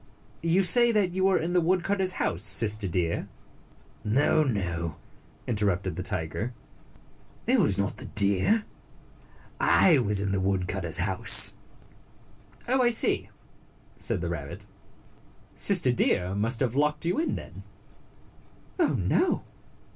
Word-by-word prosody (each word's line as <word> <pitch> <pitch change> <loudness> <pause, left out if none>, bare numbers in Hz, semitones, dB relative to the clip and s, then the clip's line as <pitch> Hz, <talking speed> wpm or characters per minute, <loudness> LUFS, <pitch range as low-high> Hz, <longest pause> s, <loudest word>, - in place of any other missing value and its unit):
You 170 +4 +1
say 240 +6 +5
that 205 -5 0
you 190 +1 -1
were 190 -1 +3
in 170 +2 -3
the 180 - +2
woodcutters 185 +2 0
house, 85 - -3
Sister 105 0 +3
Deer?" 85 -2 -2 0.4
" - - -30 0.2
No, 155 +1 +2
no," 85 - -3 0.5
interrupted 100 -6 -2
the 90 - -5
tiger. 95 +7 -4 0.4
" - - -30
It 255 +2 +2
was 105 - +1
not 100 0 -3
the - - -9
deer. 100 - +2 0.9
I 165 -7 +4
was 105 -4 +2
in 100 -1 -1
the 95 - -1
woodcutter's 95 -3 -1
house." 95 +1 +6 1.1
"Oh, 260 +2 +1
I 240 - +3
see," 230 - -1 0.7
said - - -2
the - - -4
rabbit. - - -7 0.9
"Sister 180 -10 +2
Deer 90 -6 0
must 115 +4 -3
have 125 -4 0
locked 150 +3 -1
you 175 - -1
in, 325 - -2
then." - - -10 1.2
"Oh, 335 - +1
no!" 365 - 0
115 Hz, 135 wpm, -26 LUFS, -, 1.2 s, house